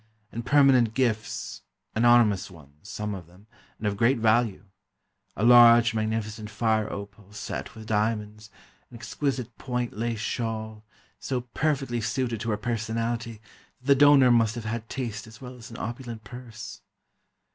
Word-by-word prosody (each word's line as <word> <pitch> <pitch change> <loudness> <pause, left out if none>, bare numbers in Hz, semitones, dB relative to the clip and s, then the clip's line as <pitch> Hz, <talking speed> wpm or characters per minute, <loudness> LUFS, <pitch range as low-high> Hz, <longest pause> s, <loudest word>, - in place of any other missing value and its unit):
And 115 - -5
permanent 130 -4 +4
gifts—anonymous 110 - +1
ones, 75 +1 -16
some 105 0 -4
of 90 -4 -8
them, 90 +4 -20 0.3
and 110 - -7
of 100 -1 -1
great 120 +6 +3
value: 110 -2 +1 0.7
a 105 - -3
large, 120 -1 +7
magnificent 110 -1 -3
fire 110 0 0
opal 100 0 -9
set 105 - -6
with 110 -1 -10
diamonds; 105 0 -2 0.4
an 120 - -11
exquisite 125 -1 -3
point 125 -2 -3
lace 115 +1 -2
shawl, 110 -1 -4 0.4
so 130 -2 -2
perfectly 130 -1 -2
suited 120 0 -2
to 115 - -3
her 105 - 0
personality 115 0 -3 0.4
that 130 - -25
the 140 - +6
donor 140 -2 +6
must 115 -1 +3
have 115 -2 -6
had 115 +1 -4
taste 115 -5 -5
as 110 0 -14
well 125 -1 -9
as 120 -1 -12
an 115 - -10
opulent 120 -1 -6
purse. 115 -1 -10
115 Hz, 145 wpm, -26 LUFS, 105-120 Hz, 0.7 s, large